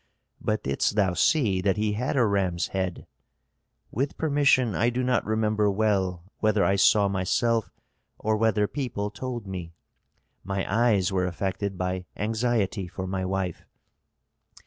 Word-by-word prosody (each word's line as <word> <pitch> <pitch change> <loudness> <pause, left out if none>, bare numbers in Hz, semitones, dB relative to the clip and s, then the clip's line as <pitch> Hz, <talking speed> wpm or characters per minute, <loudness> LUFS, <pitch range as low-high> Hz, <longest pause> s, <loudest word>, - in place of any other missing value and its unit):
"But 105 0 -1
didst 70 +8 0
thou 95 -4 +2
see 105 - +2
that 95 +1 +1
he 105 0 0
had 125 +6 -1
a 125 - +4
ram's 95 -5 0
head?" 95 -2 -3 0.9
"With 135 +5 -2
permission 140 -6 +3
I 120 +5 +2
do 125 +1 -1
not 125 0 +1
remember 110 -1 +1
well 95 -4 0 0.2
whether 110 -2 +2
I 100 - +3
saw 100 +1 +4
myself 110 +4 0 0.5
or 110 0 0
whether 110 -1 +2
people 105 -5 -3
told 120 0 -5
me. 90 -3 -7 0.7
My 95 +1 -2
eyes 105 -4 +2
were 90 -1 +1
affected 95 +2 -3
by 90 0 -2
anxiety 110 -3 0
for 95 +1 -6
my 95 0 -2
wife." 95 -2 -2
100 Hz, 145 wpm, -26 LUFS, 95-115 Hz, 0.9 s, a